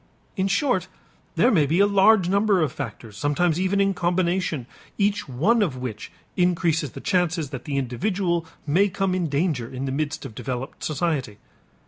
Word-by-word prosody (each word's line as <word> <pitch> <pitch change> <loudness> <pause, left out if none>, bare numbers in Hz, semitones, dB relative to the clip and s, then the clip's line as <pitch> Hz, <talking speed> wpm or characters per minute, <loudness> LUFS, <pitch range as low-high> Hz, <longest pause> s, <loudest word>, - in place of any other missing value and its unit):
In 190 -2 0
short, 265 +5 +1 0.5
there 250 - +4
may 155 -8 +3
be 165 +6 +1
a 200 - +7
large 200 -1 +5
number 200 +1 +3
of 145 - -1
factors, 110 -4 -7
sometimes 150 +7 +1
even 190 +2 +1
in 195 0 +3
combination, 175 -5 0 0.3
each 200 -6 0
one 200 - +2
of 160 -11 0
which 125 -4 -6 0.2
increases 170 -5 +1
the - - -7
chances 175 -6 0
that 130 -3 -7
the 140 -2 -2
individual 170 - -1 0.2
may 180 +8 +3
come 195 0 -1
in 180 -3 -1
danger 140 -5 0
in 130 +1 -5
the 135 - -2
midst 155 +3 -3
of - - -8
developed 130 +4 -5
society. 150 -8 -1
170 Hz, 170 wpm, -24 LUFS, 140-195 Hz, 0.5 s, a